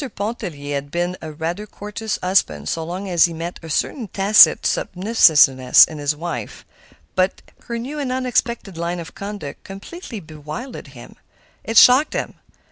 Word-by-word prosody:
Pontellier 180 -10 -5
had 140 0 -4
been 175 +3 -2
a 160 - -7
rather 170 +7 -4
courteous 210 +1 -5
husband 80 - +1
so 165 - -2
long 180 +4 -5
as 175 -3 +4
he 170 - -4
met 170 +2 -6
a 165 - -10
certain 225 - -2
tacit 195 -3 +5
submissiveness 155 - +4
in 155 -2 -9
his 145 +1 -1
wife. 170 +3 -6 0.5
But 185 +1 0 0.2
her 235 - -4
new 270 +6 -6
and 270 -3 -3
unexpected 235 -7 -2
line 170 +1 -3
of 165 - -9
conduct 200 -7 -7
completely 220 - -9
bewildered 155 - -9
him. - - -13 0.5
It 225 0 -2
shocked 260 +6 +7
him. - - -3
180 Hz, 155 wpm, -20 LUFS, 160-220 Hz, 0.5 s, shocked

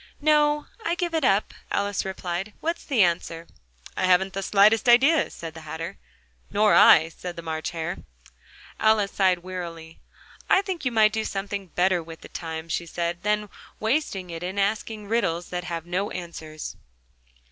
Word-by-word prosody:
"No, 295 0 +3 0.2
I 345 -5 0
give 345 -1 -2
it 320 -2 0
up," 200 -3 +2 0.2
Alice 200 -1 0
replied: 190 +1 -4
"what's 335 +2 -2
the 250 -9 +3
answer?" 170 -1 -1 0.5
"I - - 0
haven't 185 +1 +3
the 195 - -3
slightest 210 +4 +4
idea," 275 +6 +5
said 165 -1 -8
the 160 - -10
Hatter. 160 +4 -6 0.5
"Nor 210 +1 +3
I," 160 +1 +7
said 175 +1 -8
the 170 - -8
March 160 -1 -3
Hare. 165 -2 -4 0.8
Alice 215 -2 +3
sighed 185 -3 +2
wearily. 170 -3 -7 0.5
"I 385 - +5
think 370 -6 -4
you 250 - +1
might 215 -2 +4
do 220 - -1
something 195 -1 -4
better 180 +1 +1
with 165 0 -11
the - - -11
time," 160 -1 -6
she 170 +1 -2
said, 170 +1 -3
"than 210 +1 0 0.3
wasting 220 - -1
it 165 0 -6
in 185 +3 -4
asking 210 +1 -1
riddles 175 -6 0
that 180 0 -4
have 170 -2 -4
no 185 +4 -1
answers." 160 -3 -7
190 Hz, 170 wpm, -25 LUFS, 170-220 Hz, 0.8 s, I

